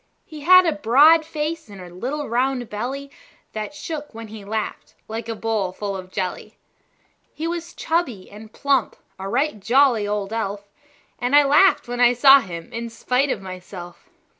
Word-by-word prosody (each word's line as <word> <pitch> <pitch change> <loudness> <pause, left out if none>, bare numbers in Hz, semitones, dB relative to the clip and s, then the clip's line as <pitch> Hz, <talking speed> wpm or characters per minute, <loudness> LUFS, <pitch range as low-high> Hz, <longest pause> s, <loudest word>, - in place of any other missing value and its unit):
He 310 -2 -10
had 365 +5 +7
a 330 - +3
broad 300 +4 +5
face, 315 -2 -4
and 200 -1 -11
a 180 -1 -11
little 275 +10 -4
round 250 +1 0
belly 270 +6 -5 0.4
That 215 +6 -5
shook 295 -5 -7
when 225 -1 -8
he 215 -1 -9
laughed, 215 +1 -5
like 225 +1 -6
a 225 - -3
bowl 215 -4 -1
full 200 +1 -5
of 185 -1 -8
jelly. 185 -2 -4 0.8
He 320 - -3
was 340 0 -5
chubby 285 - -2
and 215 +1 -12
plump 275 -3 0 0.2
a 195 +1 -5
right 275 0 0
jolly 235 -1 +3
old 205 0 -3
elf; 200 -2 -4 0.5
And 250 +3 +1
I 290 - +8
laughed 295 +6 +4
when 245 0 -4
I 245 0 +5
saw 270 +3 +7
him 170 -7 -8
in 235 0 -4
spite 250 +4 0
of 195 - -3
myself. 185 - -10
235 Hz, 175 wpm, -22 LUFS, 205-290 Hz, 0.8 s, I